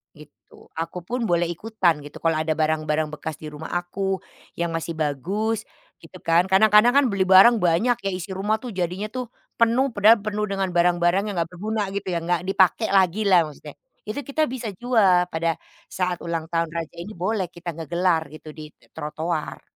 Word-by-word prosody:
Gitu. 150 Hz, -1 st, -18 dB
Akupun 180 Hz, +9 st, -3 dB
boleh 175 Hz, -2 st, +1 dB
ikutan, 175 Hz, -3 st, 0 dB
gitu. 145 Hz, 0 st, -12 dB
Kalau 165 Hz, -1 st, +2 dB
ada 155 Hz, 0 st, 0 dB
barang-barang 155 Hz, 0 st, 0 dB
bekas 155 Hz, +1 st, -6 dB
di 155 Hz, +1 st, -9 dB
rumah 150 Hz, +2 st, -8 dB
aku 190 Hz, +2 st, -2 dB, 0.3 s
yang 170 Hz, 0 st, -2 dB
masih 165 Hz, 0 st, -3 dB
bagus, 195 Hz, -, -2 dB, 0.3 s
gitu -, -, -15 dB
kan. 170 Hz, +2 st, +3 dB
Kadang-kadang 210 Hz, +5 st, +5 dB
kan 280 Hz, 0 st, +5 dB
beli 195 Hz, -1 st, 0 dB
barang 195 Hz, +6 st, +7 dB
banyak, 195 Hz, +7 st, +2 dB
ya. 195 Hz, -4 st, -3 dB
Isi 185 Hz, +2 st, -6 dB
rumah 210 Hz, +3 st, -1 dB
tuh 250 Hz, -, -6 dB
jadinya 185 Hz, +2 st, -3 dB
tuh 255 Hz, 0 st, -4 dB, 0.3 s
penuh, 235 Hz, +4 st, +3 dB
padahal 215 Hz, 0 st, +5 dB
penuh 210 Hz, 0 st, -2 dB
dengan 195 Hz, -2 st, -2 dB
barang-barang 175 Hz, +1 st, +2 dB
yang 205 Hz, -, -4 dB
nggak 165 Hz, -, -6 dB
berguna, 205 Hz, +2 st, -3 dB
gitu 200 Hz, 0 st, -4 dB
ya. -, -, +1 dB
Nggak 175 Hz, +1 st, 0 dB
dipakai 195 Hz, +3 st, +2 dB
lagi 190 Hz, +1 st, +3 dB
lah 185 Hz, -4 st, +6 dB
maksudnya. 150 Hz, -2 st, -9 dB, 0.3 s
Itu 215 Hz, +7 st, -4 dB
kita 305 Hz, +3 st, 0 dB
bisa 250 Hz, -4 st, -5 dB
jual 195 Hz, -7 st, +3 dB
pada 165 Hz, +1 st, 0 dB, 0.3 s
saat 180 Hz, -2 st, -2 dB
ulang 165 Hz, -1 st, -3 dB
tahun 165 Hz, 0 st, +1 dB
Raja, 165 Hz, -1 st, -5 dB
ini 205 Hz, -, -8 dB
boleh 190 Hz, +2 st, -1 dB
kita 175 Hz, 0 st, -7 dB
ngegelar 170 Hz, +1 st, 0 dB
gitu 155 Hz, +1 st, -12 dB
di 155 Hz, -1 st, -9 dB, 0.3 s
trotoar. 155 Hz, +1 st, -4 dB
180 Hz, 180 wpm, -23 LUFS, 165-210 Hz, 0.3 s, barang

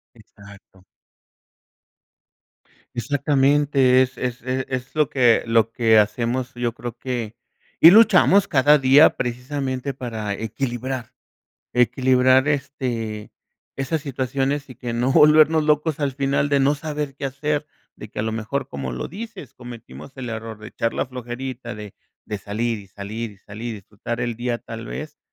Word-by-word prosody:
Exacto. 100 Hz, -3 st, -17 dB, 2.1 s
Exactamente, 135 Hz, 0 st, +3 dB
es 130 Hz, 0 st, -6 dB
es 125 Hz, -1 st, -3 dB
e 130 Hz, +1 st, -2 dB
es 130 Hz, 0 st, -4 dB
lo 150 Hz, -3 st, +2 dB
que 120 Hz, -4 st, +4 dB
lo 115 Hz, -1 st, +3 dB
que 115 Hz, -2 st, +3 dB
hacemos. 120 Hz, +4 st, 0 dB
Yo 120 Hz, -1 st, -2 dB
creo 120 Hz, 0 st, -7 dB
que 120 Hz, -3 st, -4 dB, 0.4 s
y 165 Hz, -, +10 dB
luchamos 200 Hz, -1 st, +6 dB
cada 145 Hz, +2 st, +5 dB
día 135 Hz, +3 st, +6 dB
precisamente 130 Hz, +2 st, -3 dB
para 110 Hz, -5 st, -4 dB
equilibrar, 120 Hz, +2 st, -4 dB, 0.6 s
equilibrar, 130 Hz, +2 st, +3 dB
este, 125 Hz, -7 st, -3 dB, 0.5 s
esas 145 Hz, +4 st, -2 dB
situaciones, 135 Hz, +1 st, -2 dB
y 130 Hz, -, -11 dB
que 120 Hz, -1 st, -5 dB
no 125 Hz, +3 st, +1 dB
volvernos 155 Hz, +2 st, +6 dB
locos 150 Hz, 0 st, +1 dB
al 140 Hz, -2 st, 0 dB
final 140 Hz, +1 st, 0 dB
de 140 Hz, -1 st, +2 dB
no 140 Hz, +2 st, +3 dB
saber 150 Hz, -1 st, -4 dB
qué 140 Hz, -, -4 dB
hacer, 145 Hz, +2 st, -2 dB, 0.3 s
de 110 Hz, -, -9 dB
que -, -, -9 dB
a -, -, 0 dB
lo 110 Hz, 0 st, -2 dB
mejor, 115 Hz, +5 st, -3 dB
como 70 Hz, -2 st, -5 dB
lo -, -, -4 dB
dices, 205 Hz, -, -9 dB
cometimos 120 Hz, +2 st, -11 dB
el 125 Hz, -2 st, -5 dB
error 115 Hz, -1 st, -6 dB
de 110 Hz, 0 st, -10 dB
echar 115 Hz, 0 st, -2 dB
la -, -, 0 dB
flojerita 125 Hz, -1 st, -6 dB
de 105 Hz, -2 st, -9 dB, 0.3 s
de 105 Hz, -, -5 dB
salir, 110 Hz, +3 st, -2 dB
y 100 Hz, -, -12 dB
salir, 105 Hz, +3 st, -6 dB
y 100 Hz, -, -19 dB
salir, 105 Hz, +4 st, -8 dB
y -, -, -3 dB
disfrutar 105 Hz, +4 st, -6 dB
el 120 Hz, -2 st, -2 dB
día, 120 Hz, 0 st, -2 dB
tal 115 Hz, 0 st, -8 dB
vez, 150 Hz, 0 st, -7 dB
125 Hz, 155 wpm, -22 LUFS, 115-140 Hz, 2.1 s, y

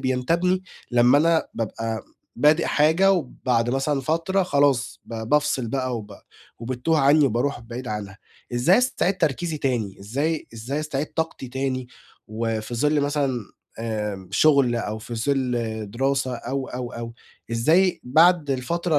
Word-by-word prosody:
بينتابِيني 170 Hz, +9 st, +1 dB, 0.3 s
لمَّا 120 Hz, +3 st, +5 dB
أنا 165 Hz, +1 st, +3 dB
بابقى 115 Hz, 0 st, -3 dB, 0.3 s
بادِئ 150 Hz, +6 st, +4 dB
حاجة، 160 Hz, +6 st, +4 dB
وبعد 125 Hz, -8 st, 0 dB
مثلًا 135 Hz, +2 st, 0 dB
فترة 165 Hz, +7 st, 0 dB
خلاص 140 Hz, -7 st, +1 dB
ب 115 Hz, -, -8 dB
بافصِل 145 Hz, -4 st, +1 dB
بقى، 130 Hz, 0 st, -1 dB
وب 105 Hz, -2 st, -8 dB, 0.4 s
وبتتوه 130 Hz, +7 st, 0 dB
عني، 145 Hz, +2 st, +5 dB
وبارُوح 125 Hz, +3 st, -1 dB
بعيد 120 Hz, +2 st, -7 dB
عنها. 100 Hz, -2 st, -5 dB, 0.4 s
إزاي 155 Hz, -, +4 dB
استعيد 200 Hz, -7 st, +1 dB
تركيزي 160 Hz, 0 st, 0 dB
تاني؟ 115 Hz, -8 st, -1 dB
إزاي 145 Hz, +10 st, -2 dB
إزاي 125 Hz, +7 st, -3 dB
استعيد 150 Hz, -1 st, -2 dB
طاقتي 160 Hz, -5 st, -3 dB
تاني؟ 130 Hz, -1 st, -3 dB, 0.4 s
وفي 110 Hz, +1 st, -3 dB
ظلّ 150 Hz, +5 st, +2 dB
مثلًا 140 Hz, -3 st, 0 dB, 0.4 s
آآ، 105 Hz, -4 st, -4 dB
شغل، 140 Hz, -6 st, +4 dB
أو 110 Hz, -2 st, -3 dB
في 115 Hz, +2 st, -7 dB
ظلّ 115 Hz, -4 st, -1 dB
دراسة، 130 Hz, +2 st, 0 dB
أو، 135 Hz, +3 st, -4 dB
أو، 125 Hz, -1 st, -5 dB
أو، 115 Hz, 0 st, -6 dB, 0.4 s
إزاي 160 Hz, +11 st, +3 dB
بعد 160 Hz, +3 st, +4 dB
الفترة 155 Hz, +5 st, 0 dB
130 Hz, 135 wpm, -24 LUFS, 115-155 Hz, 0.4 s, لمَّا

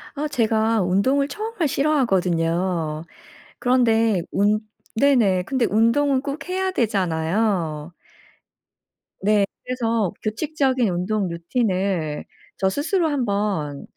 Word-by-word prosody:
아 300 Hz, +2 st, -2 dB
제가 225 Hz, -4 st, +1 dB
운동을 230 Hz, +11 st, +2 dB
정말 430 Hz, -3 st, -3 dB
싫어하거든요. 180 Hz, -, 0 dB, 0.6 s
그런데 225 Hz, -6 st, +2 dB
운 210 Hz, +2 st, +2 dB, 0.3 s
네네. 220 Hz, -8 st, +3 dB
근데 255 Hz, +3 st, 0 dB
운동은 260 Hz, +5 st, +2 dB
꼭 285 Hz, +4 st, -5 dB
해야 375 Hz, +1 st, 0 dB
되잖아요. 175 Hz, -, 0 dB, 1.3 s
네. 205 Hz, 0 st, +3 dB, 0.2 s
그래서 230 Hz, -6 st, 0 dB
규칙적인 260 Hz, +1 st, 0 dB
운동 185 Hz, +3 st, -1 dB
루틴을 180 Hz, -, -1 dB, 0.3 s
저 190 Hz, -, +1 dB
스스로 325 Hz, -, 0 dB
한번 200 Hz, -, -1 dB
215 Hz, 220 characters per minute, -22 LUFS, 180-265 Hz, 1.3 s, 네네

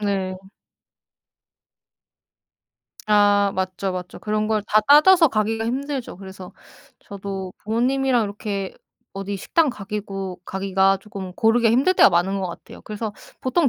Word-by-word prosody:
네. 195 Hz, -2 st, -2 dB, 2.7 s
아. 205 Hz, -1 st, +4 dB
맞죠, 190 Hz, 0 st, -2 dB
맞죠. 180 Hz, -1 st, -7 dB
그런 215 Hz, 0 st, -1 dB
걸 215 Hz, -1 st, 0 dB
다 215 Hz, +1 st, +4 dB
따져서 305 Hz, -, +6 dB
가기가 225 Hz, 0 st, -1 dB
힘들죠. 270 Hz, -3 st, -4 dB
그래서 190 Hz, -1 st, -11 dB, 0.5 s
저도 195 Hz, -2 st, -7 dB
부모님이랑 245 Hz, +2 st, +1 dB
이렇게 200 Hz, -1 st, -5 dB, 0.4 s
어디 195 Hz, +1 st, -5 dB
식당 315 Hz, -, +1 dB
가기고 195 Hz, -4 st, -6 dB
가기가 195 Hz, 0 st, +1 dB
쪼끔 195 Hz, -2 st, -8 dB
고르기가 225 Hz, +2 st, +3 dB
힘들 270 Hz, +11 st, +3 dB
때가 -, -, +7 dB
많은 190 Hz, +3 st, +1 dB
것 190 Hz, -, -2 dB
같아요. 170 Hz, 0 st, -10 dB
그래서 215 Hz, 0 st, -5 dB, 0.3 s
보통 280 Hz, +3 st, +2 dB
205 Hz, 275 characters per minute, -22 LUFS, 190-230 Hz, 2.7 s, 때가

